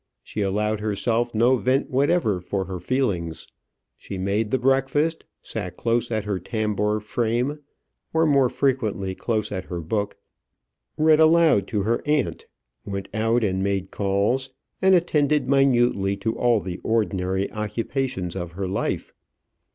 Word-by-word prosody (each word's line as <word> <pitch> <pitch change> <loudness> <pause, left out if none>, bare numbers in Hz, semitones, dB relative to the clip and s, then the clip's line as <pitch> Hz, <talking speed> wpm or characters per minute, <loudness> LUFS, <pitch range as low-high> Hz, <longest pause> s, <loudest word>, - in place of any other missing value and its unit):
She 105 - -5
allowed 105 +2 0
herself 115 +3 -1
no 120 +4 +4
vent 130 +4 0
whatever 135 - +2
for 95 +2 -3
her 90 0 -5
feelings. 85 -10 -1 0.5
She 95 - -7
made 100 +3 0
the 130 - +2
breakfast; 135 +5 +1 0.2
sat - - -5
close 115 0 0
at 110 -3 -2
her 100 -3 -1
tambour 105 +1 -1
frame, 120 +6 -1 0.5
or 160 0 +3
more 140 -4 +4
frequently 110 -9 0
close 110 +1 -2
at 95 -2 -4
her 90 - -5
book; 100 +5 -2 0.8
read 155 0 +5
aloud 160 - +5
to 105 -3 -1
her 115 +3 0
aunt; 150 -1 0 0.4
went 100 -1 -5
out 115 +2 +1
and 95 -2 0
made 100 -1 -1
calls; 100 +7 0 0.3
and 190 0 +6
attended 150 -4 +2
minutely 120 -8 +3
to 110 +3 -2
all 120 -2 +3
the 90 0 -5
ordinary 95 -4 0
occupations 105 - -3
of 85 -2 -5
her 95 +1 -3
life. 95 - -2
110 Hz, 145 wpm, -24 LUFS, 100-130 Hz, 0.8 s, and